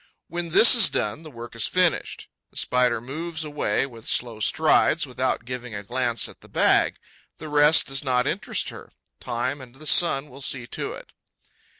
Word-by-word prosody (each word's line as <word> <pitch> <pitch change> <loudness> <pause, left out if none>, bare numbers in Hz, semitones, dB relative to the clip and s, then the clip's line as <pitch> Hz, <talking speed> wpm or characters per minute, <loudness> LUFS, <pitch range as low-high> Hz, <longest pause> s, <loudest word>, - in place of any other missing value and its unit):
When 170 +1 -4
this 225 +10 +7
is 230 -7 +5
done, 105 +8 -2
the 160 - -11
work 120 -3 -10
is 115 - +1
finished. 180 -2 0 0.2
The - - -17
Spider 125 -2 +1
moves 160 +7 -5
away 150 -2 -1
with 115 -4 -12
slow 120 -3 -1
strides, 105 - +3
without 120 - -2
giving 125 -2 -6
a 100 - -6
glance 120 0 0
at - - -15
the - - -17
bag. - - +3 0.4
The 155 - -9
rest 150 +1 +5
does 135 +1 -2
not 125 -2 +1
interest - - -2
her: - - -11 0.3
time 130 +4 -3
and 125 -1 -13
the 155 +3 -13
sun 150 -4 +3
will 135 +2 -12
see 130 -2 0
to 120 - -5
it. - - -12
130 Hz, 185 wpm, -24 LUFS, 120-155 Hz, 0.4 s, this